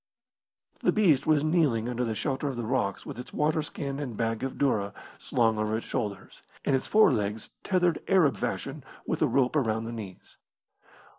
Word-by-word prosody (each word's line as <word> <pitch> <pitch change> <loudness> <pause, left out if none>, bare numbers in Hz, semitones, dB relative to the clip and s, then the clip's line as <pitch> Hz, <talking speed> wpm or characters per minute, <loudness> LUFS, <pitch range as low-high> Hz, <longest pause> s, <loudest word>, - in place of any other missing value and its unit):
The - - +3
beast 160 -11 +3
was 155 -2 +4
kneeling 155 -9 +2
under 125 0 -1
the 115 -2 -2
shelter 135 +3 -2
of 135 - -2
the 120 -1 -3
rocks 110 -5 -1
with - - -7
its 125 - -8
waterskin 150 -2 -1
and 125 -7 -5
bag 115 -1 -1
of 135 0 -2
doora 105 -8 0 0.3
slung 115 -3 +1
over 110 +1 0
its 115 - -6
shoulders, 105 -3 -4 0.2
and 135 - +3
its 130 - -2
forelegs 110 - +2
tethered 180 -3 +1
Arab 175 -8 +4
fashion - - -3 0.2
with - - -2
a - - +4
rope 130 +1 +2
around 110 -6 +1
the 115 - -5
knees. 105 -5 -9
125 Hz, 175 wpm, -28 LUFS, 110-150 Hz, 0.3 s, was